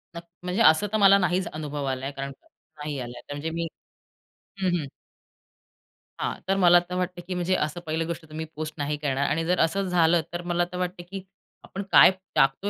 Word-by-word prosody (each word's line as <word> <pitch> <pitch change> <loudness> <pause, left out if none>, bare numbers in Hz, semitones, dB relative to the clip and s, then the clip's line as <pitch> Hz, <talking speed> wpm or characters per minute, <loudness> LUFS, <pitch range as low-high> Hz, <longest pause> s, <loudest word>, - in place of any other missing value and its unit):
न - - -4 0.2
म्हणजे 180 +5 -1
असं 160 +5 +5
तर 215 - +1
मला 200 -1 +7
नाहीच 180 0 +1
अनुभव 150 -2 -4
आलाय 130 +1 -2
कारण 140 -1 -5 0.5
नाही 150 -1 -4
आलाय 120 -1 -7
म्हणजे 145 +3 -4
मी 165 0 -3 0.9
हं, 185 - +2
हं. 155 - -3 1.3
हां, - - -1
तर 195 0 +2
मला 175 -2 +7
तर 180 - -3
वाटतं, 180 -1 -2
की 185 - -3
म्हणजे 180 +1 +1
असं 155 +1 -1
पहिली 160 +1 -1
गोष्ट 170 0 -5
तुम्ही 160 +1 -5
पोस्ट 155 0 -4
नाही 145 0 -2
करणार 140 -1 -1
आणि 165 +1 0
जर 180 +1 +1
असं 190 +4 +1
झालं 170 -1 +3
तर 175 - -3
मला 175 0 +2
तर 180 - -5
वाटतं, 180 0 -3
की 195 -1 -6 0.4
आपण 195 - -6
काय - - +9 0.2
टाकतो 135 +9 +2
170 Hz, 195 wpm, -26 LUFS, 150-180 Hz, 1.3 s, काय